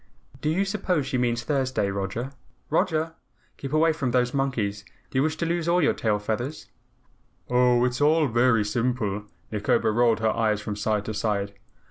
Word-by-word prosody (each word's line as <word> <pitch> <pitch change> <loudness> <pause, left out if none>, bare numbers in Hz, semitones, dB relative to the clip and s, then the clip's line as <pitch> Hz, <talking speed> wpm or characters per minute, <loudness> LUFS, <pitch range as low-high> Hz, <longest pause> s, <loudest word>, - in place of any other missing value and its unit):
"Do 150 - 0
you 185 +5 +1
suppose 190 -7 -1
she 130 -1 -1
means 120 -1 0
Thursday? 130 -6 0
Roger! 100 +7 -3 0.4
ROGER! 160 0 +1 0.4
Keep 135 - -6
away 160 +1 +3
from 140 -5 -2
those 125 0 +1
monkeys. 115 -7 -1 0.3
Do 130 - +1
you - - +4
wish 155 +2 0
to 170 - -1
lose 170 0 -1
all 175 +1 +3
your 155 - +3
tail 105 -2 0
feathers?" 110 +8 -4 0.8
"Oh, 125 0 +4
it's 125 +2 -2
all 155 +2 +4
very 120 -2 +3
simple," 105 -2 -1 0.3
Nikobo 110 +1 +1
rolled 115 0 +3
her 110 -1 +1
eyes 110 -2 +1
from 105 0 -4
side 105 0 -1
to 110 - -3
side. 100 -2 -1
125 Hz, 175 wpm, -25 LUFS, 110-150 Hz, 0.8 s, you